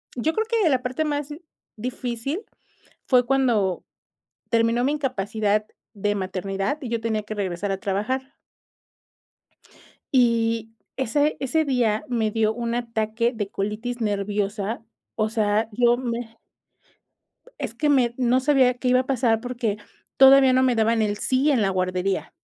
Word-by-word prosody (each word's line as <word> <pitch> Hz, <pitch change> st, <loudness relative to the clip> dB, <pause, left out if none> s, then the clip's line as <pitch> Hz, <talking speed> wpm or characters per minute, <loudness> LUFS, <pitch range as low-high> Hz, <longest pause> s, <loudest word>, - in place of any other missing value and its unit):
yo 310 Hz, +7 st, 0 dB
creo 440 Hz, +4 st, 0 dB
que 450 Hz, -8 st, +2 dB
la 260 Hz, -2 st, +2 dB
parte 255 Hz, +5 st, -2 dB
más 290 Hz, -1 st, -2 dB, 0.5 s
difícil 250 Hz, -, -4 dB, 0.7 s
fue 250 Hz, -2 st, +4 dB
cuando 235 Hz, -8 st, +1 dB, 0.7 s
terminó 230 Hz, +1 st, +2 dB
mi 290 Hz, -, +1 dB
incapacidad 215 Hz, -6 st, -1 dB, 0.3 s
de 205 Hz, +1 st, -1 dB
maternidad 195 Hz, +5 st, -2 dB
y 250 Hz, -, -5 dB
yo 230 Hz, -1 st, -2 dB
tenía 220 Hz, -2 st, -1 dB
que 215 Hz, 0 st, -6 dB
regresar 195 Hz, 0 st, -2 dB
a 195 Hz, -, -2 dB
trabajar. 260 Hz, +7 st, -2 dB, 1.8 s
Y 230 Hz, -2 st, +2 dB, 0.2 s
ese 290 Hz, +4 st, +1 dB
ese 310 Hz, +4 st, 0 dB
día 235 Hz, -5 st, +1 dB
me 225 Hz, -3 st, 0 dB
dio 220 Hz, 0 st, +1 dB
un 235 Hz, 0 st, -3 dB
ataque 230 Hz, 0 st, -1 dB
de 205 Hz, -4 st, -4 dB
colitis 215 Hz, +5 st, -4 dB
nerviosa, 205 Hz, +1 st, -2 dB, 0.3 s
o 215 Hz, -1 st, 0 dB
sea, 215 Hz, 0 st, +1 dB
yo 240 Hz, +2 st, +3 dB
me 235 Hz, -2 st, -5 dB, 1.2 s
es -, -, -4 dB
que 300 Hz, -, 0 dB
me, 250 Hz, -4 st, +3 dB
no 250 Hz, 0 st, +3 dB
sabía 260 Hz, -2 st, +3 dB
qué 250 Hz, 0 st, -4 dB
iba 255 Hz, +1 st, +4 dB
a -, -, -10 dB
pasar 235 Hz, -4 st, +1 dB
porque 240 Hz, -4 st, -2 dB, 0.4 s
todavía 270 Hz, -1 st, +7 dB
no 260 Hz, 0 st, +4 dB
me 255 Hz, -2 st, +3 dB
daban 225 Hz, 0 st, +2 dB
el 205 Hz, -1 st, 0 dB
sí 265 Hz, +6 st, +2 dB
en 255 Hz, -, +2 dB
la 195 Hz, -, +2 dB
guardería 185 Hz, +1 st, -1 dB
230 Hz, 145 wpm, -24 LUFS, 210-255 Hz, 1.8 s, todavía